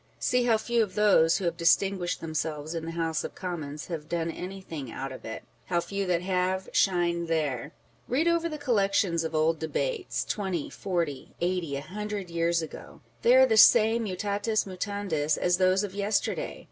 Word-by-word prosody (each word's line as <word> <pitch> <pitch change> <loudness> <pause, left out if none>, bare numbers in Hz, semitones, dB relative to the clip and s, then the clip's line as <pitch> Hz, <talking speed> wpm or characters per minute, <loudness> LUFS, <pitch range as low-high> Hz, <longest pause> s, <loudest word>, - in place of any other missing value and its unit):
See 250 -1 +1
how 230 -2 +4
few 235 +1 0
of 195 -4 -2
those 200 -6 +4
who 195 - -4
have 170 -1 0
distinguished 175 +2 +2
themselves 155 -1 -3
in 165 -1 -4
the 165 - -4
House 165 -2 -1
of - - -6
Commons 155 -5 -5
have 160 -3 -6
done 165 -1 -1
anything 175 -8 -7
out 135 0 -5
of 130 - -9
it; 110 - -6 0.2
how 175 -1 +1
few 195 +2 -3
that 175 -1 +1
have, 185 0 0
shine 170 -2 +2
there! 150 -4 -1 0.4
Read 290 +7 +1
over 335 0 +2
the 305 - -5
collections 200 - +1
of 160 0 -4
old 155 +1 +2
Debates, 450 - -2
twenty, 190 -7 -3
forty, 170 -8 -3
eighty, 175 -4 -1
a 140 - -3
hundred 205 +1 -5
years 170 0 +1
ago; 160 - -10 0.2
they 485 +1 +5
are - - +8
the 450 -3 +2
same 225 - +6
mutatis 205 +3 -1
mutandis, 185 -5 -1
as 180 0 +2
those 185 +1 +3
of 200 -2 -5
yesterday. 205 - -1
180 Hz, 180 wpm, -28 LUFS, 165-205 Hz, 0.4 s, are